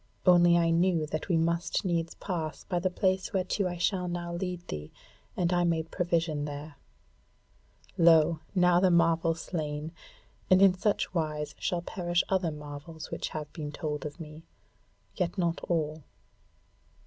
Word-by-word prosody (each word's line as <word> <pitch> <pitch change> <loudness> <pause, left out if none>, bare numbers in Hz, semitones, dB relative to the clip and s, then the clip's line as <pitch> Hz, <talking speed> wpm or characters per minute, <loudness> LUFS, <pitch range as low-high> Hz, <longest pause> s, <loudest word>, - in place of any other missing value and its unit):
Only 175 -1 +6
I 165 -1 +3
knew 170 -1 +2
that 155 +4 -4
we 170 - +3
must 170 +3 0
needs 170 -2 -1
pass 165 -6 -4
by 175 -2 -1
the 185 +2 0
place 185 +1 0
whereto 190 +1 0
I 175 -1 -4
shall 180 +1 0
now 175 0 -4
lead 180 0 -4
thee, 75 0 -6 0.5
and 175 0 +1
I 175 0 +3
made 165 -2 0
provision 165 -4 0
there. 145 0 -7 1.2
Lo! 165 -1 +5 0.2
now 180 -1 +5
the 185 0 +4
marvel 165 -1 +3
slain: 155 -2 -4 0.6
and 185 - +6
in 195 -1 +7
such 200 0 0
wise 155 -3 -2
shall 175 -1 -1
perish 175 -1 0
other 190 -3 +1
marvels 150 +1 -8
which - - -3
have 150 -2 -6
been 150 -3 -5
told 150 -1 -4
of 150 +2 -7
me; 155 -1 -9 0.8
yet 180 0 -1
not 170 -2 0
all. 155 -2 -1
170 Hz, 155 wpm, -29 LUFS, 155-180 Hz, 1.2 s, in